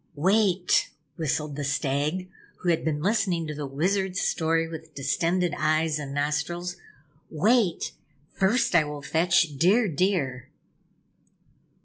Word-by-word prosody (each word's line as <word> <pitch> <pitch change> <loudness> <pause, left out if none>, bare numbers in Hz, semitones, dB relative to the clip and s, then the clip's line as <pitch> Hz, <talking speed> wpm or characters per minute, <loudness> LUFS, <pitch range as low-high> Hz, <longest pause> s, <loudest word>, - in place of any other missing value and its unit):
"Wait," 190 +2 +2 0.3
whistled 150 -2 -2
the 145 - -4
Stag, 145 +6 -1 0.3
who 180 - 0
had 165 - +1
been 150 -1 -1
listening 190 -5 +1
to 155 - -4
the 145 -1 -5
Wizard's 185 +6 0
story 165 0 +1
with 160 0 -9
distended 175 +5 0
eyes 155 0 +1
and 140 -2 -6
nostrils. 150 +5 -2 0.5
"Wait, 200 +3 +2 0.4
first 200 +5 +1
I 170 -3 +5
will 150 -1 -7
fetch 165 -1 +2
Dear 205 +7 +4
Deer." 155 -7 -1
165 Hz, 120 wpm, -26 LUFS, 150-185 Hz, 0.5 s, I